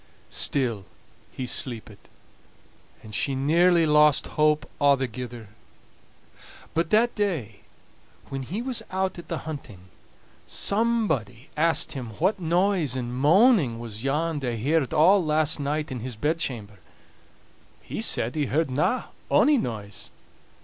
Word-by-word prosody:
Still 115 -8 -1 0.5
he 130 - -5
sleepit, 115 -4 -3 1.0
and 110 - -11
she 135 +5 0
nearly 165 +5 +3
lost 150 -1 +4
hope 150 0 +2
a'thegither. 125 -5 0 1.2
But 165 0 0
that 230 +3 +3
day 160 - -2 0.7
when 135 -1 -4
he 190 - -4
was 255 -2 -1
out 190 -1 -2
at 170 - -11
the 165 - -5
hunting, 110 - -8 0.6
somebody 200 - 0
asked 160 +1 +2
him 125 -7 -7
what 190 +4 +1
noise 175 - +1
and 120 -2 -4
moaning 160 - +4
was 115 -1 -7
yon 150 +3 0
they 120 -4 -3
heard 145 +3 +1
all 175 +5 +5
last 155 -1 +2
night 145 +1 -2
in 125 - -4
his 125 +1 -5
bedchamber. 120 - -2 1.0
He - - -5
said 115 +3 +1
he 150 -3 -1
heardna 150 - 0 0.2
ony 295 -3 +4
noise. 105 - -5
150 Hz, 120 wpm, -25 LUFS, 120-170 Hz, 1.2 s, all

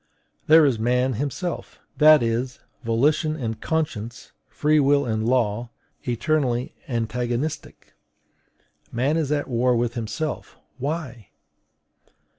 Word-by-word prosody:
There 160 0 +7
is 130 -6 +1
man 125 +3 +1
himself; 145 - -4 0.2
that 155 -3 +7
is, 120 +2 -2 0.2
volition 145 +7 +1
and 115 -7 -4
conscience, 120 -8 -3 0.2
free 150 +1 +2
will 140 0 +3
and 110 -1 -1
law, 120 -2 +1 0.4
eternally 125 0 0
antagonistic. 120 +4 -3 1.0
Man 130 +6 +1
is 155 -3 0
at 145 -1 0
war 125 0 +2
with 120 0 0
himself: 120 +7 -4 0.2
why? 135 - -4
125 Hz, 105 wpm, -24 LUFS, 115-150 Hz, 1.0 s, There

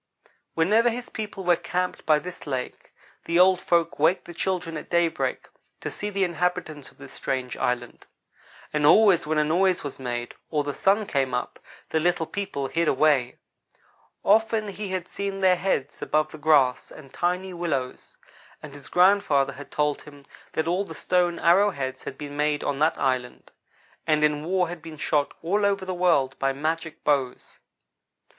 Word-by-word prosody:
Whenever 215 +9 +3
his 240 +1 -5
people 210 -3 -6
were 175 -1 +4
camped 180 +1 -3
by 155 -1 +5
this 175 +1 -8
lake 130 -3 -5 0.3
the 170 - 0
old 185 0 +5
folks 170 -3 +1
waked 160 +5 +2
the 175 - -9
children 175 -1 -2
at 155 - -7
daybreak 170 -1 0 0.3
to - - -5
see 205 - -4
the 200 -1 0
inhabitants 170 -4 -2
of - - -24
this - - -12
strange 130 -2 -3
island; 120 -1 -3 0.7
and 150 -1 0
always 190 -4 +5
when 155 0 0
a 150 - +4
noise 180 +4 +2
was 145 -2 -6
made, 120 -2 -4 0.2
or 150 -2 0
the 145 0 -3
sun 205 +7 +2
came 135 -7 0
up, 125 - -4 0.3
the 160 - +2
little 170 0 +1
people 165 -5 -4
hid 165 +4 0
away. 135 -4 +2 0.9
Often 220 0 +3
he 200 0 -6
had 185 -1 -3
seen 200 -1 -4
their 185 -1 +5
heads 175 -7 -2
above 155 0 0
the 155 - -10
grass 145 -5 +3
and 135 -3 -14
tiny 180 +4 -1
willows, 150 -8 -4 0.5
and 150 -2 -9
his 145 -1 -10
grandfather 180 -8 +3
had 145 +2 -11
told 150 -1 0
him 145 -1 -14 0.3
that 160 +1 -1
all 180 +4 +1
the - - -10
stone 175 -1 +1
arrow 190 +5 +4
heads 130 -7 -5
had 135 - -6
been 145 -1 -7
made 150 0 0
on 140 -1 -2
that 160 +2 +2
island, 130 -2 -2 0.6
and 150 -1 +2
in 150 0 +2
war 180 0 +1
had 175 -1 -7
been 160 -1 -10
shot 145 -1 0
all 200 +5 +1
over 200 -1 +1
the 185 - -3
world, 165 -7 +2
by 135 0 +1
magic 160 +3 -3
bows. 135 -4 -1
165 Hz, 180 wpm, -25 LUFS, 145-185 Hz, 0.9 s, by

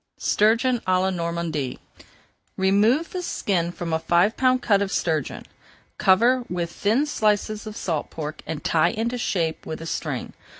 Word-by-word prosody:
STURGEON 235 +4 +2
À 185 0 +3
LA 190 +1 +1
NORMANDY 170 -6 -3 0.8
Remove 210 - +3
the 365 - -3
skin 175 - -1
from 170 -2 -5
a 160 - +2
five 175 +6 +2
pound 255 -1 +2
cut 200 -3 +3
of 200 -1 -1
sturgeon, 155 -4 -1 0.5
cover 240 +7 +4
with 175 -1 -2
thin 225 +11 +1
slices 215 -4 0
of 215 - -7
salt 160 -5 -2
pork, 155 -1 -6
and 155 -2 -5
tie 165 +1 +3
into 235 +4 -2
shape 165 -8 -1
with 155 - -5
a 165 - -7
string. - - -4
190 Hz, 160 wpm, -24 LUFS, 170-225 Hz, 0.8 s, cover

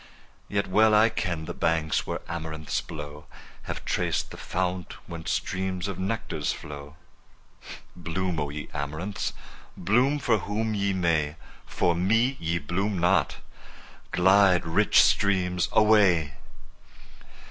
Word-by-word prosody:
Yet 100 0 0
well 110 +3 +4
I 110 +2 +6
ken 85 -7 -3
the - - -5
banks 80 -1 0
where - - -4
amaranths 80 -2 -3
blow, 75 -2 -9 0.4
Have - - -6
traced - - -1
the - - -9
fount 90 -1 -3
whence 85 -1 -7
streams 95 -1 -2
of 95 -2 -5
nectar 100 +4 -3
flow. 75 0 -5 1.0
Bloom, 90 0 -3
O 75 -1 -2
ye 75 0 -6
amaranths! 75 +8 -3 0.4
bloom 125 +10 +2
for 120 -6 +1
whom 110 +3 -2
ye 100 -1 0
may, 80 -5 0 0.3
For 85 - +1
me 115 +9 +2
ye 85 +1 -1
bloom 95 +6 -2
not! 90 +3 +2 0.7
Glide, 95 -1 +4
rich 90 +6 +4
streams, 90 -3 +2
away! 95 -9 +4
90 Hz, 125 wpm, -26 LUFS, 80-100 Hz, 1.0 s, I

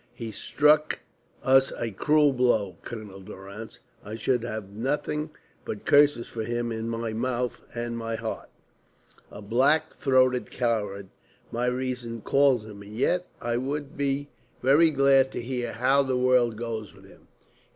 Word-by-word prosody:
He 115 -2 -6
struck 150 +8 +2 0.5
us 135 0 +5
a 115 - -3
cruel 150 +7 +3
blow, 110 -8 +1
Colonel 105 -4 -8
Durrance. 100 +3 -10 0.3
I 105 +2 -6
should 120 +2 0
have 110 -4 -5
nothing 145 +7 -2 0.3
but 105 - -6
curses 145 -4 +4
for 115 - -5
him 120 +1 -2
in 115 0 -3
my 115 -1 -3
mouth 125 +1 -2
and 120 0 -3
my 115 -1 -3
heart. - - -5 0.8
A 105 - -10
black 140 +9 +2
throated 130 -2 +3
coward 105 -5 -2 0.4
my 120 +2 -1
reason 125 -2 -3
calls 135 -4 +3
him, 105 -2 -10
and 105 +1 -11
yet 180 +7 +1
I 120 0 -1
would 140 +3 -3
be 140 0 -1 0.3
very 145 +6 +6
glad 135 -2 +4
to - - -3
hear 120 -1 -3
how 130 +5 +3
the 130 -2 0
world 125 -2 +3
goes 110 -3 -5
with - - -17
him. - - -19
120 Hz, 150 wpm, -26 LUFS, 110-135 Hz, 0.8 s, very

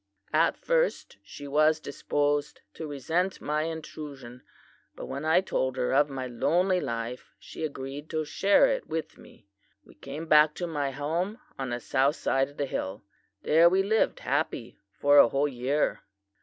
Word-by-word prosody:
"'At - - +3
first - - 0
she 145 - -10
was 155 +2 +3
disposed 145 0 -1
to 160 - -6
resent 160 +7 -1
my 150 +1 -1
intrusion; 145 -6 -8 0.5
but - - -7
when 140 - -5
I 160 +3 +4
told 130 -8 -1
her 125 0 0
of 145 +2 +4
my 135 -2 -4
lonely 175 +10 +1
life 115 +2 -4
she - - -9
agreed 140 0 -6
to 155 -1 -2
share 195 - +4
it - - -1
with 160 0 -5
me. 100 - -17 0.4
We - - -17
came 140 +8 -7
back 150 -1 +5
to 175 - -3
my 145 -4 -2
home 165 - -2 0.2
on 135 -1 -3
the 120 0 -2
south 140 +4 +1
side 135 +1 0
of 145 - -18
the 145 - 0
hill. 100 -6 -4 0.4
There 165 +3 +6
we 190 +2 +2
lived 220 +3 +1
happy - - -2
for 145 +5 +4
a 120 - +7
whole 140 +3 +1
year. 135 +2 -1
145 Hz, 170 wpm, -28 LUFS, 135-160 Hz, 0.5 s, a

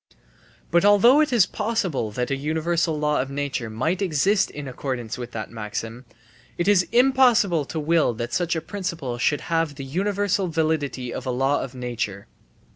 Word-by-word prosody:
But 170 0 +4
although 205 +8 +6
it 305 - +1
is 230 -7 +5
possible 205 - -2
that 125 +5 -3
a - - +2
universal 160 +3 -1
law 150 -1 +1
of 135 - -5
nature 140 -4 -3
might 155 - -1
exist 195 +4 +2
in 145 -1 -7
accordance 125 -3 -4
with 120 -1 -6
that 110 -1 -5
maxim, 115 +2 -6 0.5
it 175 - -1
is 195 -3 +4
impossible 240 - +4
to 160 - -4
will 155 -5 +2
that 120 +1 -5
such 175 -1 0
a 160 - -2
principle 165 -8 -4
should 145 +4 +1
have 165 -3 -1
the 135 -1 -7
universal 200 +5 0
validity 155 -6 -1
of 130 - -6
a - - 0
law 135 +3 +1
of 130 -1 -7
nature. 120 -5 -4
155 Hz, 175 wpm, -23 LUFS, 125-185 Hz, 0.5 s, although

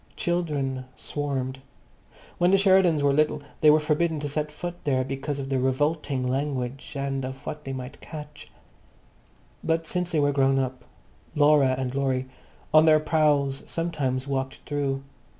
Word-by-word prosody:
Children 145 -7 -1
swarmed. 135 -3 -3 0.8
When 175 0 +4
the 195 - +5
Sheridans 190 -6 +4
were 140 -1 +4
little 150 0 +1 0.2
they 155 - +6
were 155 +1 +6
forbidden 155 +1 0
to 145 - -2
set 150 +1 -2
foot 175 +3 -7
there 130 -3 +1
because 135 +2 -4
of 135 -1 -5
the 135 -1 +1
revolting 135 0 0
language 135 0 -3
and 135 -1 -2
of 130 +2 -7
what 150 -1 -6
they 135 - -4
might 130 0 -7
catch. 150 -2 -9 1.1
But 165 0 0
since 180 +2 -2
they 160 - +2
were 145 0 +3
grown 135 -1 +3
up, 130 -1 -2 0.5
Laura 145 -3 +5
and 130 -1 -2
Laurie 135 -2 0 0.5
on 155 0 +7
their 155 -1 +6
prowls 150 -3 +2
sometimes 145 -6 -2
walked 135 -1 -3
through. 140 -2 -2
145 Hz, 155 wpm, -26 LUFS, 135-155 Hz, 1.1 s, on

